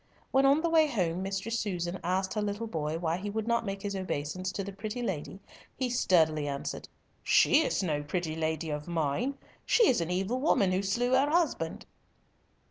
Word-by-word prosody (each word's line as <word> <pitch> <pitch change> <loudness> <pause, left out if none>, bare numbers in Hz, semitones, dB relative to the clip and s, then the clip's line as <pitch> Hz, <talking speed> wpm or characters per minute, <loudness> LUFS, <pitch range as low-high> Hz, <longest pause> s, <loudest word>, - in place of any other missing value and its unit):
When 270 +1 +4
on 280 +3 +4
the 335 - +1
way 320 -1 +5
home 180 - -1
Mistress 195 +4 -2
Susan 180 -3 -3
asked 190 +2 0
her 215 - -1
little 205 +2 -2
boy 160 -6 -2
why 165 0 -1
he 200 +3 -5
would 220 +1 -3
not 235 -2 +1
make 195 0 -4
his 200 -1 -3
obeisance 185 0 -3
to 200 - -3
the 200 +1 -7
pretty 215 +5 -5
lady, 190 -3 -4 0.4
he 255 -2 -1
sturdily 160 -10 +3
answered, 140 -1 -4 0.3
"She 300 - +5
is 240 - 0
no 150 -5 0
pretty 160 +1 -3
lady 160 0 -2
of 150 +1 -4
mine. 170 - -1 0.3
She 465 -4 +4
is 240 - +3
an 165 - -2
evil 195 +8 -1
woman 205 - +3
who 185 +1 +1
slew 235 +6 0
her 270 +3 +4
husband." 300 - 0
195 Hz, 195 wpm, -30 LUFS, 165-235 Hz, 0.4 s, way